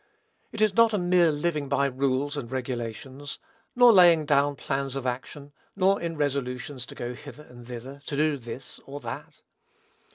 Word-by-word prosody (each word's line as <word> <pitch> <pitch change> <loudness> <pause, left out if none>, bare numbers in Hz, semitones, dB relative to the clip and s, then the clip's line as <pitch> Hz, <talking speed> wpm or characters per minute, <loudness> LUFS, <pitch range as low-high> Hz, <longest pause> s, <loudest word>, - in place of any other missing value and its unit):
It 220 - -5
is 215 -2 +4
not 230 +1 +5
a - - +2
mere 175 -2 +4
living 150 -1 -1
by 140 0 +2
rules 135 +1 0
and 130 -5 -5
regulations; 130 +2 -5 0.4
nor 245 -1 +8
laying 170 -5 +7
down 145 -1 +3
plans 135 0 -3
of 135 -2 -4
action; 140 +3 -5 0.2
nor 195 +1 +3
in 165 -2 -3
resolutions 130 -2 -2
to - - -10
go 120 +1 -4
hither 145 +3 -11
and 120 -3 -14
thither, 125 +3 -8
to 145 - -3
do 155 -1 +2
this 125 +1 -9
or 140 +1 -6
that. - - -8
140 Hz, 170 wpm, -27 LUFS, 130-155 Hz, 0.4 s, nor